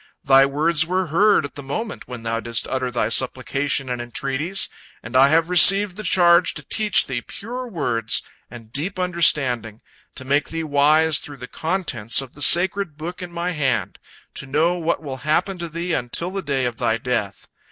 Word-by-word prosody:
Thy 135 Hz, -1 st, +5 dB
words 150 Hz, +3 st, +2 dB
were 185 Hz, +1 st, -1 dB
heard 205 Hz, -3 st, +3 dB
at 140 Hz, -, -9 dB
the 145 Hz, -, -8 dB
moment 205 Hz, +12 st, -6 dB
when 125 Hz, -2 st, -9 dB
thou 115 Hz, 0 st, -2 dB
didst 115 Hz, 0 st, -3 dB
utter 130 Hz, -1 st, -2 dB
thy 120 Hz, -3 st, -1 dB
supplication 135 Hz, +3 st, -1 dB
and 125 Hz, -1 st, -4 dB
entreaties, 140 Hz, +9 st, -1 dB, 0.4 s
and 115 Hz, +3 st, -9 dB
I 135 Hz, +1 st, +6 dB
have 165 Hz, +2 st, +2 dB
received 185 Hz, +2 st, +6 dB
the 215 Hz, -, -7 dB
charge 175 Hz, -3 st, +3 dB
to -, -, -8 dB
teach 215 Hz, -1 st, +2 dB
thee 130 Hz, -3 st, -4 dB
pure 245 Hz, -, -8 dB
words 120 Hz, -, -1 dB, 0.3 s
and 115 Hz, -3 st, -13 dB
deep 165 Hz, +8 st, -4 dB
understanding, 135 Hz, -, +1 dB, 0.4 s
to 130 Hz, -, -8 dB
make 140 Hz, +2 st, 0 dB
thee 165 Hz, 0 st, -4 dB
wise 155 Hz, +1 st, +3 dB
through 145 Hz, -1 st, -9 dB
the 125 Hz, -1 st, -9 dB
contents 155 Hz, -, -1 dB
of 135 Hz, -2 st, -6 dB
the 145 Hz, -, -12 dB
sacred 175 Hz, -1 st, +4 dB
book 170 Hz, +4 st, -7 dB
in 180 Hz, -1 st, -7 dB
my 170 Hz, +1 st, -3 dB
hand, 135 Hz, -8 st, -2 dB, 0.3 s
to 140 Hz, -, -8 dB
know 155 Hz, +6 st, +1 dB
what 170 Hz, -2 st, -2 dB
will 135 Hz, -3 st, -6 dB
happen 170 Hz, +7 st, -1 dB
to 170 Hz, -1 st, -5 dB
thee 170 Hz, +2 st, -4 dB
until 160 Hz, +7 st, -2 dB
the 195 Hz, 0 st, -4 dB
day 140 Hz, -5 st, -2 dB
of 120 Hz, -2 st, -4 dB
thy 110 Hz, -, 0 dB
death. 110 Hz, -6 st, -4 dB
150 Hz, 190 wpm, -21 LUFS, 130-175 Hz, 0.4 s, I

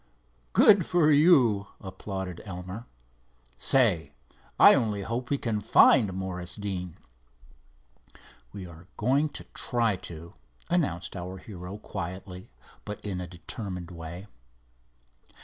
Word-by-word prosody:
"Good 200 Hz, -4 st, +7 dB
for 165 Hz, -4 st, +3 dB
you," 135 Hz, -, +5 dB
applauded 95 Hz, -1 st, -6 dB
Elmer. 95 Hz, +4 st, -7 dB, 0.7 s
"Say, 100 Hz, -, +2 dB, 0.5 s
I -, -, +9 dB
only 105 Hz, -3 st, 0 dB
hope 120 Hz, +4 st, -4 dB
we 140 Hz, -, +1 dB
can 110 Hz, -5 st, -2 dB
find 105 Hz, 0 st, +5 dB
Morris 90 Hz, -1 st, -5 dB
Deane." 95 Hz, -4 st, -5 dB, 1.5 s
"We 95 Hz, +4 st, -8 dB
are 85 Hz, 0 st, -13 dB
going 135 Hz, +7 st, +2 dB
to -, -, -7 dB
try 115 Hz, -5 st, 0 dB
to," 85 Hz, -1 st, -10 dB, 0.4 s
announced 95 Hz, -, 0 dB
our 90 Hz, +1 st, -6 dB
hero, 95 Hz, 0 st, -8 dB
quietly, 90 Hz, -1 st, -7 dB, 0.3 s
but 105 Hz, 0 st, -6 dB
in 95 Hz, -3 st, -3 dB
a 90 Hz, -, -6 dB
determined 90 Hz, +1 st, -6 dB
way. 85 Hz, +2 st, -8 dB
95 Hz, 115 wpm, -28 LUFS, 90-115 Hz, 1.5 s, I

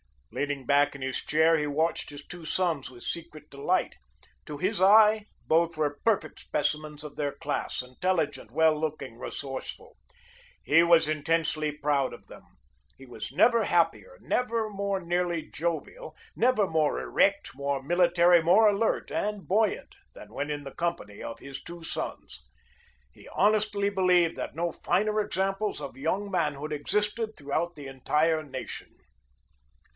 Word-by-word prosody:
Leaning 145 Hz, -2 st, -3 dB
back 145 Hz, +2 st, +3 dB
in 140 Hz, -, -9 dB
his 130 Hz, -1 st, -2 dB
chair, 160 Hz, +2 st, +3 dB
he 150 Hz, -1 st, -1 dB
watched 160 Hz, +3 st, -1 dB
his 145 Hz, 0 st, -10 dB
two 175 Hz, -2 st, -10 dB
sons 165 Hz, -6 st, 0 dB
with 120 Hz, -2 st, -11 dB
secret 155 Hz, -3 st, -6 dB
delight. 160 Hz, +7 st, -1 dB, 0.5 s
To 150 Hz, -, -7 dB
his 185 Hz, +4 st, 0 dB
eye, 210 Hz, +2 st, +6 dB, 0.2 s
both 165 Hz, 0 st, +2 dB
were 145 Hz, -2 st, -1 dB
perfect 200 Hz, -9 st, +1 dB
specimens 150 Hz, 0 st, -2 dB
of 150 Hz, -2 st, -9 dB
their 145 Hz, -2 st, -1 dB
class, -, -, -3 dB
intelligent, 155 Hz, +4 st, -2 dB
well 160 Hz, -1 st, +3 dB
looking, 150 Hz, -7 st, -4 dB
resourceful. 135 Hz, -2 st, -6 dB, 0.7 s
He 165 Hz, +3 st, +5 dB
was 170 Hz, -2 st, +5 dB
intensely 155 Hz, 0 st, 0 dB
proud 145 Hz, -2 st, 0 dB
of -, -, -13 dB
them. -, -, -13 dB, 0.5 s
He 135 Hz, -, -13 dB
was 120 Hz, -4 st, -7 dB
never 235 Hz, -2 st, +4 dB
happier, 175 Hz, -, +1 dB
never 230 Hz, -3 st, -1 dB
more 200 Hz, -1 st, -2 dB
nearly 175 Hz, -1 st, -1 dB
jovial, 170 Hz, -, -4 dB, 0.2 s
never 235 Hz, -4 st, +3 dB
more 160 Hz, -4 st, +1 dB
erect, 200 Hz, 0 st, +1 dB
more 140 Hz, 0 st, -2 dB
military, 175 Hz, +2 st, +4 dB
more 195 Hz, +7 st, +5 dB
alert, 205 Hz, +2 st, 0 dB
and 210 Hz, -1 st, -2 dB
buoyant 210 Hz, +2 st, 0 dB, 0.2 s
than -, -, -12 dB
when 145 Hz, -, -3 dB
in 145 Hz, -1 st, -3 dB
the 135 Hz, -, -9 dB
company 170 Hz, -12 st, -3 dB
of 115 Hz, -, -7 dB
his 140 Hz, -1 st, -8 dB
two 170 Hz, -1 st, -10 dB
sons. 65 Hz, -, -5 dB, 0.7 s
He -, -, -17 dB
honestly 205 Hz, 0 st, +2 dB
believed 180 Hz, -4 st, +3 dB
that -, -, -5 dB
no 170 Hz, +1 st, -1 dB
finer 210 Hz, +7 st, 0 dB
examples 195 Hz, 0 st, -1 dB
of 140 Hz, -2 st, -7 dB
young 190 Hz, +8 st, -2 dB
manhood 150 Hz, -4 st, -1 dB
existed 210 Hz, +8 st, -1 dB
throughout 160 Hz, +4 st, -2 dB
the 145 Hz, -2 st, -9 dB
entire 150 Hz, +4 st, +1 dB
nation. 135 Hz, -4 st, -8 dB
165 Hz, 150 wpm, -28 LUFS, 145-195 Hz, 0.7 s, eye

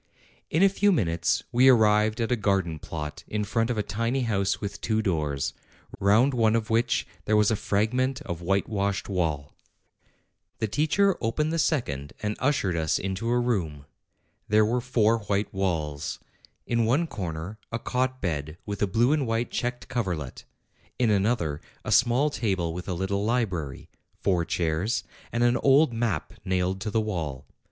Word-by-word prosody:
In 165 Hz, +5 st, +3 dB
a -, -, +8 dB
few 200 Hz, +1 st, +2 dB
minutes 85 Hz, -, +1 dB
we 130 Hz, +2 st, +6 dB
arrived 110 Hz, -2 st, +4 dB
at 115 Hz, +1 st, -1 dB
a -, -, +4 dB
garden 95 Hz, -7 st, 0 dB
plot 75 Hz, -1 st, -6 dB
in 105 Hz, 0 st, -2 dB
front 115 Hz, +3 st, 0 dB
of 120 Hz, -, -1 dB
a 105 Hz, -, +1 dB
tiny 115 Hz, +6 st, -1 dB
house 100 Hz, -5 st, 0 dB
with 100 Hz, -2 st, -5 dB
two 110 Hz, -1 st, 0 dB
doors, 75 Hz, -8 st, -1 dB, 0.5 s
round 110 Hz, +8 st, +4 dB
one 115 Hz, -2 st, +3 dB
of 115 Hz, 0 st, -1 dB
which 115 Hz, +2 st, +2 dB, 0.2 s
there 110 Hz, -, +3 dB
was 105 Hz, 0 st, +4 dB
a -, -, +3 dB
fragment 125 Hz, +7 st, 0 dB
of 85 Hz, -, -5 dB
whitewashed 100 Hz, +2 st, 0 dB
wall. 80 Hz, -7 st, -2 dB, 1.0 s
The 110 Hz, -, -1 dB
teacher 160 Hz, -, +2 dB
opened 150 Hz, +8 st, 0 dB
the 165 Hz, -, 0 dB
second 75 Hz, -, -1 dB
and 105 Hz, 0 st, -1 dB
ushered 130 Hz, -10 st, +1 dB
us 80 Hz, -2 st, +1 dB
into 95 Hz, +4 st, -3 dB
a 120 Hz, +1 st, +3 dB
room. 85 Hz, -13 st, -1 dB, 0.6 s
There 105 Hz, +1 st, +4 dB
were 120 Hz, +3 st, 0 dB
four 115 Hz, -2 st, +2 dB
white 100 Hz, 0 st, -2 dB
walls: 80 Hz, -6 st, -2 dB, 0.5 s
in 115 Hz, -1 st, +1 dB
one 135 Hz, +9 st, +2 dB
corner 95 Hz, -, -5 dB
a 115 Hz, -, -1 dB
cot 130 Hz, +2 st, -1 dB
bed 75 Hz, -3 st, -3 dB
with 100 Hz, -1 st, -5 dB
a 105 Hz, -, +3 dB
blue 115 Hz, +7 st, +2 dB
and 145 Hz, -5 st, 0 dB
white 115 Hz, +1 st, -1 dB
checked 125 Hz, 0 st, -3 dB
coverlet; 90 Hz, -, -3 dB, 0.5 s
in 120 Hz, -3 st, +2 dB
another, 100 Hz, -8 st, +1 dB, 0.2 s
a -, -, -2 dB
small 130 Hz, +4 st, +4 dB
table 95 Hz, -, -1 dB
with 90 Hz, +2 st, -6 dB
a 90 Hz, -, -1 dB
little 95 Hz, +3 st, -1 dB
library; 95 Hz, -, -1 dB, 0.3 s
four 90 Hz, -3 st, +1 dB
chairs, 85 Hz, +7 st, 0 dB, 0.3 s
and 120 Hz, +1 st, +1 dB
an 120 Hz, 0 st, +4 dB
old 140 Hz, -1 st, +4 dB
map 115 Hz, -1 st, -1 dB
nailed 95 Hz, 0 st, 0 dB
to 110 Hz, -, -2 dB
the 110 Hz, +2 st, +1 dB
wall. 80 Hz, -10 st, -4 dB
105 Hz, 170 wpm, -26 LUFS, 90-120 Hz, 1.0 s, a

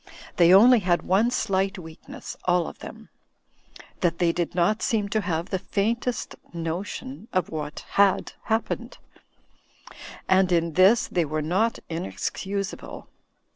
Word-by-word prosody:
They 175 Hz, 0 st, +6 dB
only 235 Hz, +6 st, +8 dB
had 175 Hz, -3 st, +1 dB
one 200 Hz, +6 st, +2 dB
slight 195 Hz, -4 st, 0 dB
weakness, 160 Hz, -3 st, -10 dB
aH 180 Hz, -1 st, +3 dB
of -, -, -9 dB
them; -, -, -11 dB, 0.9 s
that 170 Hz, -1 st, +1 dB
they 170 Hz, -1 st, +2 dB
did 175 Hz, 0 st, -3 dB
not 185 Hz, +5 st, +2 dB
seem 210 Hz, -3 st, 0 dB
to 215 Hz, +2 st, 0 dB
have 170 Hz, -2 st, -3 dB
the 190 Hz, -, 0 dB
faintest 225 Hz, +4 st, -2 dB, 0.2 s
mo 165 Hz, +1 st, -3 dB
tion 175 Hz, -, -8 dB
of 185 Hz, -3 st, 0 dB
what 150 Hz, -2 st, -5 dB, 0.2 s
had 200 Hz, -2 st, +2 dB
happened. 235 Hz, +2 st, -2 dB, 1.3 s
And 190 Hz, -1 st, +3 dB
in 170 Hz, -1 st, +1 dB
this 190 Hz, +7 st, +5 dB
they 175 Hz, -, 0 dB
were 155 Hz, 0 st, -2 dB
not 195 Hz, +9 st, +1 dB
inexcusable. 180 Hz, -, -5 dB
185 Hz, 135 wpm, -25 LUFS, 170-205 Hz, 1.3 s, only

